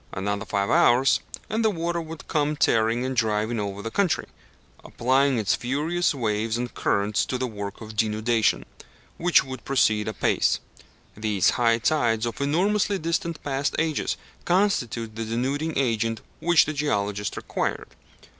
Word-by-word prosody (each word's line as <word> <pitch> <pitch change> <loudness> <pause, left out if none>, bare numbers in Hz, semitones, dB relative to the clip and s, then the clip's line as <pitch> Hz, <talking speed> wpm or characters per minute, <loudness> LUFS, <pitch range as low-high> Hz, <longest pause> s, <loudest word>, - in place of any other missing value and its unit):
Another 100 +2 -2
five 100 0 -1
hours, 125 +3 +4 0.3
and 220 +1 -1
the 220 - +4
water 170 -2 -2
would 160 -1 -9
come 150 -1 0
tearing 115 -2 +2
and 130 0 -2
driving 110 0 0
over 100 0 -4
the 115 - -4
country, 195 -5 +1 0.6
applying 130 +2 +2
its 110 -1 +1
furious 150 +7 0
waves 110 -2 -1
and 120 0 -4
currents 100 +1 +1
to 130 - -2
the 130 - -1
work 100 -3 -6
of 110 -1 -9
denudation, 110 +1 +1 0.5
which 175 +1 +4
would 130 -3 -8
proceed 110 -6 +2
apace. 110 - +1 0.6
These 105 -3 +2
high 115 -2 +3
tides 115 -4 +1
of 115 +3 -4
enormously 195 +8 +1
distant 165 -1 -2
past 140 0 -1
ages 160 -2 0 0.3
constitute 125 - 0
the 115 - -3
denuding 135 +8 -2
agent 115 -4 0 0.2
which 175 -1 +4
the 155 - -3
geologist 105 -8 -1
required. - - -3
120 Hz, 145 wpm, -25 LUFS, 110-155 Hz, 0.6 s, hours